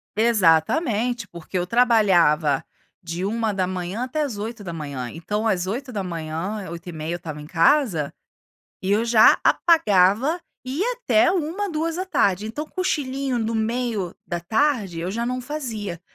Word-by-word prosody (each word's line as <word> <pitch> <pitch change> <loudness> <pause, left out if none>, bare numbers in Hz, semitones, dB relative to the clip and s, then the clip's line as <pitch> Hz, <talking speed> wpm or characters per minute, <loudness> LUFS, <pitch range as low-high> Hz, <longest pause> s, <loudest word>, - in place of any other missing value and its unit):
Exatamente, 225 - +2
porque 170 +1 -6
eu 175 - 0
trabalhava 180 - +3 0.4
de 170 +1 -4
1:00 195 -2 -2
até 280 +5 -2
às 260 -8 -4
8:00, 165 - -5
então 210 +7 -2
às 185 -4 0
8:00, 190 - -4
8:30 170 -1 -6
eu - - -2
estava 155 -3 -7
em - - -9
casa, 170 - +2 0.7
e 190 - -1
eu 210 +3 +3
já 230 -2 +6
apagava 265 - +3 0.3
e 260 +4 -4
ia 480 +6 +1
até 360 -8 +3
13:00, 370 +3 -2
14:00, 320 - 0
então 295 +8 -5
cochilinho 275 -7 -2
no 225 0 -1
meio 225 -4 -1
da 175 - -3
tarde, 215 - 0
eu 175 +3 -3
já 230 +3 -2
não 250 +1 -2
fazia, 225 - -5
215 Hz, 135 wpm, -23 LUFS, 175-255 Hz, 0.7 s, já